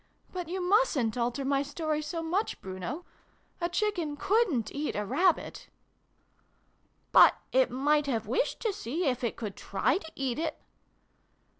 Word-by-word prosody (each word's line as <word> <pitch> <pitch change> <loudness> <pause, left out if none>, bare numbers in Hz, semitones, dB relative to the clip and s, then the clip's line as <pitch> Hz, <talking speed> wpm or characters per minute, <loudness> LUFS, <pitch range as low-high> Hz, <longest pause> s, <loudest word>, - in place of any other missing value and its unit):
But 360 -3 -4
you 370 +1 -2
mustn't 355 - +3
alter 245 +3 -1
my 275 0 +2
story 305 +1 -2
so 330 +2 -4
much, 365 +7 -1
Bruno. 190 - -6 0.6
A 345 - 0
Chicken 350 -6 -1
couldnt 360 - +1
eat 295 +1 -2
a 210 - -1
Rabbit! 330 - +1 0.5
" - - -40
" - - -41
But - - +8 0.2
it - - +4
might 290 +3 +2
have 230 -5 -1
wished 450 - 0
to 440 -3 0
see 340 - -3
if 255 -2 0
it 235 - -1
could 210 -4 -5
try 255 - 0
to 320 -4 -11
eat 270 0 -2
it." 320 -1 -2
300 Hz, 160 wpm, -29 LUFS, 250-360 Hz, 0.6 s, But